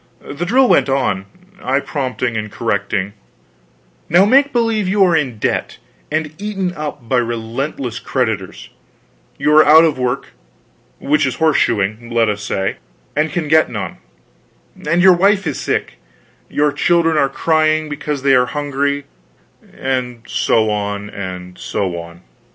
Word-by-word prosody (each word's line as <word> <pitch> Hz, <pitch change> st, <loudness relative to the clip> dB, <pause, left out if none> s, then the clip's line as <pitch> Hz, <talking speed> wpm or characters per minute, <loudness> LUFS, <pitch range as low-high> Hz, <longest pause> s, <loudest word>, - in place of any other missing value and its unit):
The 155 Hz, +5 st, -6 dB
drill 255 Hz, +5 st, +4 dB
went -, -, +3 dB
on, 125 Hz, -8 st, 0 dB, 0.3 s
I 130 Hz, +2 st, +1 dB
prompting 130 Hz, -4 st, -3 dB
and 110 Hz, -1 st, -4 dB
correcting: 100 Hz, +1 st, -2 dB, 1.0 s
"Now, 175 Hz, +5 st, +5 dB
make 275 Hz, +6 st, +4 dB
believe 225 Hz, -4 st, +1 dB
you 195 Hz, +1 st, +3 dB
are 175 Hz, -3 st, +3 dB
in 135 Hz, -8 st, -1 dB
debt, -, -, -2 dB, 0.3 s
and 155 Hz, -1 st, -2 dB
eaten 195 Hz, -4 st, -2 dB
up 150 Hz, -7 st, -6 dB
by 130 Hz, -, +1 dB
relentless 120 Hz, +2 st, -3 dB
creditors; 110 Hz, -8 st, -3 dB, 0.7 s
you 150 Hz, -, +2 dB
are 155 Hz, -, +8 dB
out 155 Hz, +2 st, +7 dB
of 155 Hz, -5 st, +1 dB
work 125 Hz, -1 st, -2 dB, 0.7 s
which 150 Hz, 0 st, +1 dB
is 130 Hz, -, -2 dB
horse 160 Hz, -2 st, +2 dB
shoeing, 110 Hz, +2 st, 0 dB
let 115 Hz, -2 st, +2 dB
us 105 Hz, 0 st, -2 dB
say 95 Hz, -1 st, -2 dB, 0.4 s
and 150 Hz, +1 st, +1 dB
can 160 Hz, -1 st, -2 dB
get 160 Hz, +1 st, +4 dB
none; -, -, -5 dB, 0.9 s
and 170 Hz, +2 st, +3 dB
your 190 Hz, -1 st, +8 dB
wife 195 Hz, +2 st, +2 dB
is 150 Hz, -4 st, -3 dB
sick, -, -, -2 dB, 0.5 s
your 150 Hz, 0 st, +1 dB
children 165 Hz, +2 st, +2 dB
are 140 Hz, -3 st, +2 dB
crying 155 Hz, 0 st, +1 dB
because 150 Hz, -2 st, -4 dB
they 140 Hz, -1 st, +4 dB
are 125 Hz, -1 st, +4 dB
hungry 145 Hz, 0 st, -2 dB, 0.4 s
" -, -, -28 dB
And 125 Hz, -3 st, -3 dB
so 110 Hz, -1 st, +1 dB
on, 105 Hz, 0 st, -3 dB
and 90 Hz, -2 st, -7 dB
so 95 Hz, -3 st, -2 dB
on. 85 Hz, +1 st, -11 dB
140 Hz, 150 wpm, -17 LUFS, 115-160 Hz, 1.0 s, are